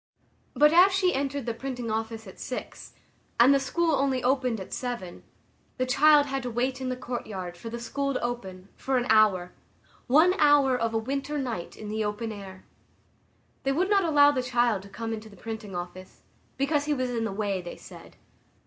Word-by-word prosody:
But 300 +1 +5
as 365 +3 +7
she 370 -1 +2
entered 275 -1 -2
the 235 - -2
printing 245 -2 -5
office 225 0 -3
at 190 - -12
six, 255 - -7 0.5
and 250 +4 +7
the 275 - +4
school 330 +5 0
only 270 -2 +1
opened 250 -3 +1
at 190 - -8
seven, 240 -8 -5 0.6
the 255 - 0
child 290 +3 +5
had 270 -1 -3
to 250 - -4
wait 255 +3 -2
in 260 - -2
the 255 - -2
courtyard, 210 -8 -5
for 230 +6 -8
the 235 - -5
school 275 +3 -2
to - - -2
open, 195 -6 -5
for 265 -1 -1
an 245 - 0
hour—one 215 - +2
hour 290 -3 +5
of 230 -2 -1
a - - +3
winter 275 +6 -3
night 240 -11 -4
in 215 - -8
the 215 +1 -2
open 210 +2 -3
air! 195 -2 -10 1.0
They 275 - 0
would 370 +7 0
not 400 -1 +4
allow 290 -3 +5
the 265 -3 -1
child 240 -4 +1
to 200 - -13
come 225 +2 -5
into 220 0 -7
the 200 - -16
printing 220 -2 -7
office, 180 +1 -8 0.3
because 285 +1 +1
he 300 0 0
was 255 -2 -2
in 230 -2 -1
the 225 - -2
way, 200 -2 -2
they 175 - -8
said. - - -13
245 Hz, 195 wpm, -27 LUFS, 215-275 Hz, 1.0 s, as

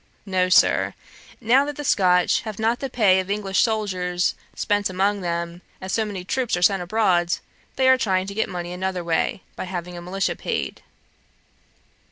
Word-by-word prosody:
No, 185 -2 +1
Sir; 185 - +4 0.4
now 245 +4 +4
that 290 0 -4
the 295 - -6
Scotch 180 -8 +3
have 215 -3 -7
not 225 +2 +1
the 270 - -4
pay 200 -6 +4
of 185 0 -4
English 200 -2 0
soldiers 185 -5 0 0.2
spent 205 -1 0
among 195 +2 0
them, 170 0 -3 0.2
as 190 0 -6
so 220 - +1
many 200 -4 -5
troops 245 -3 0
are 175 - -2
sent 195 0 +4
abroad, 175 -3 +2 0.4
they 260 -1 +2
are 260 0 +6
trying 185 -5 +1
to 200 - -6
get 220 - -1
money 175 -1 -5
another 185 0 -3
way, 170 +2 -1
by - - -5
having 180 -1 -5
a 175 - -7
militia 190 +3 -2
paid. - - -3
190 Hz, 180 wpm, -23 LUFS, 180-215 Hz, 0.4 s, are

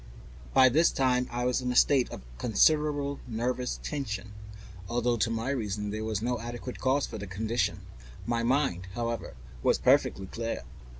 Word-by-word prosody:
By 130 -1 +8
this 155 +7 +4
time 125 -1 +1
I 120 +1 -2
was 125 +1 +1
in 125 0 -1
a - - -3
state 130 0 +4
of - - -8 0.2
considerable 145 - +2
nervous 120 - -2
tension, 110 - -4 0.6
although 120 0 +1
to 115 +1 +1
my 115 +3 -1
reason 105 -5 -2
there 110 +1 -3
was 110 -1 -2
no 120 0 0
adequate 120 +2 -6
cause 135 +2 +2
for 110 - -7
my 100 - -6
condition. 110 +5 -1 0.4
My 115 0 0
mind, 115 -8 +1
however, 115 - -3 0.3
was - - +3
perfectly 95 - +3
clear. 115 - -4
120 Hz, 165 wpm, -29 LUFS, 110-130 Hz, 0.6 s, By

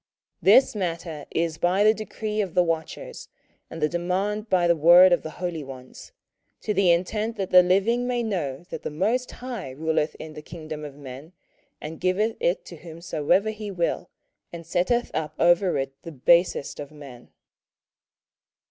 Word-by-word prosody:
27:004:017 - - +7
This 265 - +4
matter 170 -5 -4
is 165 -1 -1
by 180 +4 +2
the 215 +1 +6
decree 215 0 -4
of 190 -5 -5
the 180 - +5
watchers, 165 -2 -4 0.4
and 165 - -8
the - - +4
demand 190 +6 -2
by 180 -2 +3
the 170 0 +4
word 175 +3 +7
of 175 - +2
the 160 - -6
holy 175 -4 -3
ones: 130 -2 -11 0.5
to 210 - -1
the 195 -3 +4
intent 210 +6 0
that 195 -2 -3
the 180 - +9
living 200 +7 +1
may 245 -1 -1
know 170 - -3
that - - -5
the - - -4
most 220 +11 -1
High 245 - -7
ruleth 155 +2 -1
in 155 -1 -9
the 150 - -9
kingdom 155 -1 -8
of 145 -2 -8
men, 140 +4 -10 0.5
and 155 +1 -8
giveth 205 +5 +1
it - - 0
to - - -10
whomsoever 170 +4 -1
he 210 -1 -7
will, 175 -1 -2 0.4
and 170 -1 -9
setteth 185 +9 0
up 155 -1 -3
over 175 0 +3
it 135 0 -3
the 165 - -9
basest 170 +2 +2
of 145 - -6
men. 140 -5 -13
175 Hz, 175 wpm, -25 LUFS, 155-205 Hz, 0.5 s, the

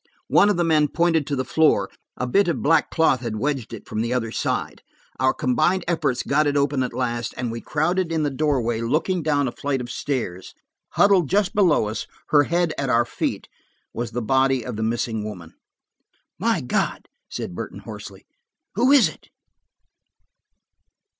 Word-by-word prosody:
One 205 - +5
of 205 - +1
the 175 - +2
men 155 -3 +3
pointed 165 -2 +1
to 145 - -1
the 130 -1 -2
floor; 160 +4 +3 0.3
a 125 - -2
bit 195 +11 +2
of 170 - -1
black 160 0 +3
cloth 160 -6 +2
had 115 -3 -4
wedged 135 +1 -2
it, 115 - -9
from 110 0 -2
the 115 +1 -2
other 120 -3 -1
side. - - -2 0.4
Our 130 +1 +4
combined 155 +10 +1
efforts 150 -7 0
got 150 +2 +2
it 145 0 +1
open 140 -1 +1
at 125 - -1
last, 120 -1 -3
and 125 -2 -2
we 115 0 -5
crowded 170 +3 0
in 160 -2 0
the 145 - 0
doorway, 130 -6 0
looking 165 +9 0
down 145 -3 +1
a - - -2
flight 140 +1 -2
of 120 0 -6
stairs. 115 -13 -4 0.4
Huddled 195 -6 +4
just 200 0 +1
below 175 - +3
us, 110 - -4 0.2
her 145 -1 +5
head 170 0 0
at 135 -2 -1
our 120 -1 +3
feet, - - -3 0.5
was 120 0 -3
the 120 +1 -4
body 130 +1 +2
of - - -5
the 110 - -4
missing 110 -1 -1
woman. 90 -6 -8 0.9
"My - - +1
God," - - -2 0.4
Burton 90 - -6
said - - -12
hoarsely, - - -9 0.5
"who 245 +7 +3
is 280 -4 +7
it?" - - -12
140 Hz, 180 wpm, -23 LUFS, 120-160 Hz, 0.9 s, is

